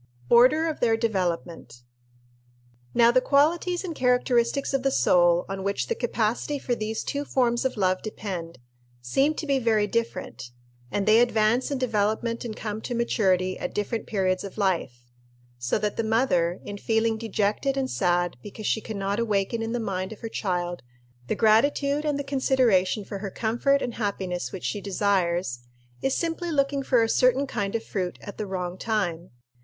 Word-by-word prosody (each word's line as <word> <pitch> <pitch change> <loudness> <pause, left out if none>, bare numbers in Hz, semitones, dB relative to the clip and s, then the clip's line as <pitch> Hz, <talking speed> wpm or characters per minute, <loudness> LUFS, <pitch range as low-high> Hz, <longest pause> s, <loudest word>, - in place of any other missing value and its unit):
Order 255 +7 +6
of 315 -2 -2
their 225 -2 +3
Development. 175 - -3 1.1
Now 235 0 +6
the 255 +1 +4
qualities 335 +7 +2
and 355 -3 -4
characteristics 250 0 +1
of 270 - +1
the 270 - +2
soul 175 -8 +3
on 195 0 -4
which 190 -11 -2
the - - +2
capacity 240 +4 -1
for 255 -2 -2
these 220 -1 -3
two 285 0 -2
forms 245 -3 +1
of 260 -3 -1
love 185 -2 +1
depend 185 -7 -6 0.5
seem 275 - +2
to 310 - -4
be 275 -2 +1
very 220 -4 +2
different, 230 - -3 0.4
and 200 +7 -1
they 215 +1 +6
advance 235 0 +2
in 280 - -1
development 230 -1 0
and 225 -3 -5
come 215 0 -4
to 245 - -4
maturity 185 -6 +1
at - - -5
different 210 +2 -2
periods 185 -3 0
of 200 0 -8
life; 135 - -1 0.5
so 120 0 0
that 210 -1 -2
the 230 - 0
mother, 220 -7 +1
in 205 0 -6
feeling 225 +1 +1
dejected 220 +4 -1
and 265 -1 -1
sad 175 -3 +1
because 210 - -9
she 220 - +1
can 220 -2 -6
not 200 +2 -1
awaken 220 0 0
in 225 0 -3
the 240 - -1
mind 190 -3 -3
of 220 - -10
her 225 - -5
child 175 -4 -2 0.5
the - - 0
gratitude 280 +6 +3
and 295 -2 0
the 285 - -3
consideration 250 -8 +2
for 200 - -6
her 200 0 -4
comfort 240 +7 +1
and 245 - -3
happiness 190 -5 -3
which 190 - -7
she 205 - -2
desires, 180 -9 0 0.4
is 270 - 0
simply 335 +1 -2
looking 280 -1 +1
for 250 -3 +3
a - - +1
certain 255 +4 +3
kind 200 -6 -3
of 225 - -1
fruit 185 -3 -3
at 205 - -9
the 210 - -3
wrong 180 -1 -4
time. 180 -7 -2
220 Hz, 180 wpm, -26 LUFS, 190-250 Hz, 1.1 s, Order